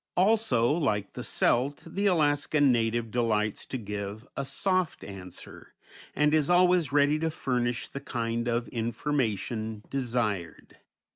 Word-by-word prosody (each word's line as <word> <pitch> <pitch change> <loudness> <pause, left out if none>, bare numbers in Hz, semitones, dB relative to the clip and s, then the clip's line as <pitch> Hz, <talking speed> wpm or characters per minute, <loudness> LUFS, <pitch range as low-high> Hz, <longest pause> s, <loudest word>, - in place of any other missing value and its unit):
Also, 185 - +3
like 110 - 0
the - - -6
Celt, 135 +4 +1
the 200 +1 -1
Alaskan 145 -4 +3
native 115 -1 0
delights 110 -3 0
to 130 - -3
give 105 0 -6
a 140 - -2
"soft 185 +5 0
answer," 95 -3 -10 0.4
and 150 0 +3
is 155 -1 +2
always 180 -2 +4
ready 145 +1 +3
to 160 +1 0
furnish 125 -5 -1
the 140 - -7
kind 115 -2 -2
of 120 0 0
information 115 -3 -2
desired. 115 -9 -2
125 Hz, 130 wpm, -28 LUFS, 110-150 Hz, 0.4 s, always